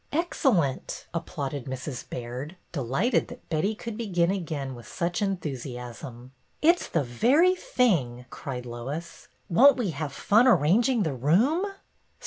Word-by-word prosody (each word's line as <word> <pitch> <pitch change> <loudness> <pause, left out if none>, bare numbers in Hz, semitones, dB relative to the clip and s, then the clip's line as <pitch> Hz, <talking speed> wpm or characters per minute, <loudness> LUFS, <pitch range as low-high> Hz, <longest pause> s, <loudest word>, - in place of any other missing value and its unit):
'' - - -39
Excellent! 260 - 0
" - - -37
applauded 145 -5 -4
Mrs. 130 0 -6
Baird, 125 +7 -6 0.2
delighted 140 - 0
that 245 - -12
Betty 165 +7 +1
could 230 0 -6
begin 180 -6 +1
again 155 -8 -3
with 120 -2 -11
such 175 -1 -2
enthu 190 -7 -1
siasm. 125 -1 -8 0.3
'Mt's 340 +3 +4
the 165 - +1
very 260 - +4
thing!" 175 - 0
cried 125 -3 -6
Lois. 135 +8 -6 0.2
''Won't 270 +10 +6
we 220 -8 -1
have 150 -1 -4
fun 215 - +4
arranging 220 - +4
the 155 - -1
room 215 - +2
165 Hz, 140 wpm, -27 LUFS, -, 0.3 s, Won't